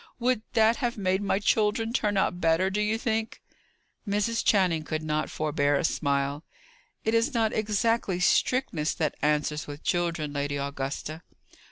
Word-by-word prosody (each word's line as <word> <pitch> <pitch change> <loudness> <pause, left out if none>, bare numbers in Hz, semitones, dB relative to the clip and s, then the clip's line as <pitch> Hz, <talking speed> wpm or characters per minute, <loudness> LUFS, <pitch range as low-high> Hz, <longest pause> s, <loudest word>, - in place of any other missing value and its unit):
"Would 250 -2 +1
that 225 0 +4
have 240 -3 -2
made 190 -1 0
my 200 -1 +1
children 215 +2 +1
turn 210 -5 +1
out 180 -2 0
better, 165 +3 +2
do 210 +2 0
you 210 +1 +1
think?" 225 -1 -2 0.7
Mrs. 210 +3 0
Channing 180 -6 +3
could 155 0 -3
not 155 0 -1
forbear 145 -2 0
a 140 - 0
smile. 140 -1 0 0.6
"It 220 - +1
is 230 +4 +2
not 225 -2 +2
exactly 215 -2 0
strictness 180 -5 +1
that 155 -4 0
answers 150 0 0
with 145 +1 -8
children, 170 -4 -1
Lady 145 0 -2
Augusta." 140 +3 -4
185 Hz, 155 wpm, -27 LUFS, 150-220 Hz, 0.7 s, that